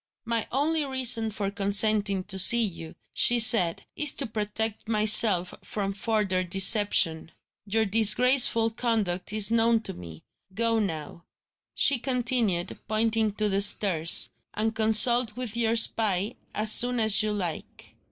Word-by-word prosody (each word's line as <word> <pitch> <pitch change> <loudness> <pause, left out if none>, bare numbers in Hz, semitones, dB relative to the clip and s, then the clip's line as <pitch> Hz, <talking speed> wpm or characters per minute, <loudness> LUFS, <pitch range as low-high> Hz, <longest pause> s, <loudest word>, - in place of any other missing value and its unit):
"My 230 -1 -3
only 300 +4 -1
reason 250 -5 0
for 205 -2 -5
consenting 200 -1 -1
to 190 0 -1
see 235 +5 +6
you," 165 -6 -7 0.2
she 240 - +2
said, 220 -7 +3
"is 295 -1 -1
to 275 - -4
protect 220 0 -4
myself 215 -4 +2
from 200 -2 -5
further 195 -2 -2
deception. 190 -3 +1 0.4
Your 220 +2 -1
disgraceful 225 +2 +3
conduct 215 -6 -3
is 215 0 0
known 230 0 +1
to - - -5
me. 85 -2 -13 0.3
Go 230 0 0
now," 170 -4 -6 0.5
she 275 -3 +2
continued, 240 -8 -2
pointing 220 -1 -1
to 210 0 -3
the 195 0 -2
stairs, 180 -5 +2 0.2
"and 220 +1 -2
consult 220 +1 +3
with 245 -4 -7
your 230 -1 -1
spy, 215 -3 0 0.2
as 215 0 0
soon 245 +2 +3
as 220 -2 +3
you 215 0 -3
like." 180 -6 -7
215 Hz, 140 wpm, -24 LUFS, 195-230 Hz, 0.5 s, see